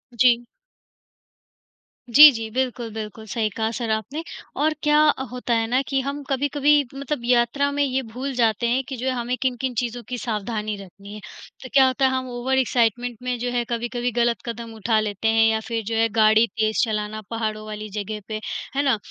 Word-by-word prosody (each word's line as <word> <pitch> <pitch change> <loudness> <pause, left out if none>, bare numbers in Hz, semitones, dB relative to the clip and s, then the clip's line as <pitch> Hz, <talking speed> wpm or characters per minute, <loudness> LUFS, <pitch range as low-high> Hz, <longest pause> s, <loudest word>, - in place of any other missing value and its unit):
जी। 240 0 +4 1.7
जी, 295 +4 +10
जी, 225 -2 -5
बिल्कुल, 250 -2 -2
बिल्कुल 220 0 -7
सही 220 -3 0
कहा 220 +2 -2
सर 235 -1 -4
आपने, 270 +9 -3 0.3
और 310 +1 +1
क्या 300 0 +4
अ, 265 - 0
होता 250 -1 -2
है 225 0 +1
ना 255 +2 +2
कि 270 -1 0
हम 280 +2 -4
कभी-कभी 285 +2 +2
मतलब 280 -1 -3
यात्रा 245 +3 +2
में 285 0 +1
ये 265 -1 0
भूल 270 +3 -3
जाते 235 -1 +2
हैं 255 +3 +1
कि 270 - -5
जो 250 - -5
है, - - +2
हमें 245 +1 -2
किन-किन 255 0 -1
चीज़ों 240 0 -4
की 250 - -3
सावधानी 215 -1 -3
रखनी 200 +1 -12
है। - - -8 0.4
तो 255 - -8
क्या 270 -1 +7
होता 260 +1 +1
है, 260 - +3
हम 260 -1 -2
ओवर 250 +2 -1
एक्साइटमेंट 240 -1 +1
में, 250 -1 -1
जो 245 +1 -2
है, 240 -1 0
कभी-कभी 240 +1 -2
गलत 235 0 +1
कदम 230 -1 -6
उठा 220 +1 +1
लेते 210 0 -2
हैं 225 0 +4
या 220 0 +1
फिर 230 -2 -2
जो 225 +2 -3
है, 225 0 +3
गाड़ी 220 +1 +5
तेज़ 220 -1 0
चलाना 215 -1 -2
पहाड़ों 215 -1 -3
वाली 215 0 -6
जगह 210 +1 -5
पे, 215 -1 -4 0.4
है 280 - +2
ना? 265 -5 +2
240 Hz, 200 wpm, -23 LUFS, 220-260 Hz, 1.7 s, जी